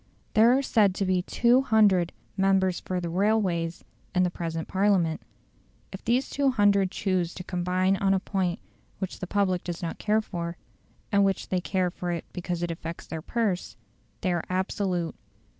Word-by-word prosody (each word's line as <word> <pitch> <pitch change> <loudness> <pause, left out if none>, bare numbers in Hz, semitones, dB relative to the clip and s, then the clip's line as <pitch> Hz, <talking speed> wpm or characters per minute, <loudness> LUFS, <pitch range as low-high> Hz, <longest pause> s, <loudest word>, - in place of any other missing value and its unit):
There 230 +4 +6
are 275 - 0
said 205 -7 +3
to 195 - 0
be 185 -1 +2
200 220 -6 +3 0.2
"members 190 -2 +2
for 185 -1 -3
the 175 - -3
railways" 180 -3 0 0.3
in 180 - +4
the 180 - +1
present 165 -2 -4
Parliament. 190 -5 +2 0.7
If 190 - -8
these 245 +4 +1
200 205 -8 +3
choose 185 -3 -1
to 180 - -6
combine 185 +1 +1
on 195 0 +2
a - - +1
point 185 -2 -1 0.4
which 190 -2 -5
the 185 - -5
public 185 -2 +1
does 175 0 -5
not 165 - -4
care 215 +1 +2
for, 170 -4 -5 0.5
and 200 0 +4
which 195 -2 0
they 185 -1 0
care 185 -1 0
for 175 -1 -3
because 175 -1 -3
it 175 - -1
affects 165 0 -6
their 160 -1 -6
purse, 205 -1 -2 0.4
they 185 -4 +1
are 175 - -1
absolute. 185 -2 -1
185 Hz, 165 wpm, -27 LUFS, 175-200 Hz, 0.7 s, There